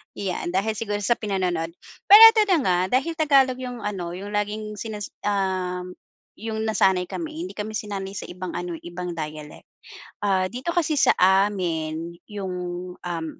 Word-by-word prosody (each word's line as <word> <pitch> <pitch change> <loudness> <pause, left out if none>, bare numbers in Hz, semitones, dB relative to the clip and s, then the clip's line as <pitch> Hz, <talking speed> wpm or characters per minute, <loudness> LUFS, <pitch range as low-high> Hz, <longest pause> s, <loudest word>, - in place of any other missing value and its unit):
'Yan, 180 -2 -3
dahil 215 +3 0
siguro 205 -2 -2
sa 235 +4 +2
pinanonood. 180 -5 -2 0.3
Pero 415 +2 +10
ito 445 -1 +3
na - - +5
nga, 180 -2 +2 0.2
dahil 335 +5 -4
Tagalog 270 -5 +4
yung 250 -2 -6
ano, 180 -4 -4
yung 200 +3 -7
laging 210 +1 -3
sinas 210 -2 -5
ah, 185 -3 -1 0.5
yung 220 0 -4
nasanay 190 -4 +2
kami, 320 0 -5
hindi 370 - -8
kami 215 +1 -4
sinanay 200 -2 -4
sa 200 - -6
ibang 180 0 -6
ano, 175 -1 -4
eh, - - -20
ibang 175 +1 -5
dialect. 155 -1 -7 0.6
Ah, 190 -2 +2
dito 255 - -4
kasi 330 -3 +1
sa 245 - +5
amin, 170 -4 +1
yung, 195 -3 -5 0.4
um, 170 -2 -4
200 Hz, 160 wpm, -24 LUFS, 180-220 Hz, 0.6 s, Pero